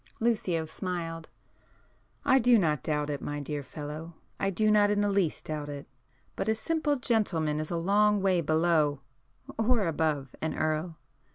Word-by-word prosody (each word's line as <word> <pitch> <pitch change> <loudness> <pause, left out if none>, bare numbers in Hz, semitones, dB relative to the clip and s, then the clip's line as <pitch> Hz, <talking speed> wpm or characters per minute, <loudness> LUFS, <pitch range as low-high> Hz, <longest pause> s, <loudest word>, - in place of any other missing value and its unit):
Lucio 205 -8 +1
smiled. 165 -1 -5 1.0
"I 265 -1 +5
do 245 -1 +5
not 155 - +1
doubt 150 0 -1
it, 145 - -4
my 145 0 -4
dear 145 0 -4
fellow,—I 155 +7 -6
do 215 +3 +2
not 205 -1 +5
in 205 0 +2
the 205 0 +1
least 195 -5 0
doubt 150 -1 -4
it. 145 -1 -6 0.5
But 205 - -2
a 220 - +3
simple 310 +4 0
'gentleman' 185 - 0
is 155 - -4
a 170 - -1
long 205 +4 +3
way 190 -2 +2
below—or 160 - 0
above—an 155 -2 -2
Earl. 155 +1 -1
165 Hz, 150 wpm, -29 LUFS, 150-210 Hz, 1.0 s, I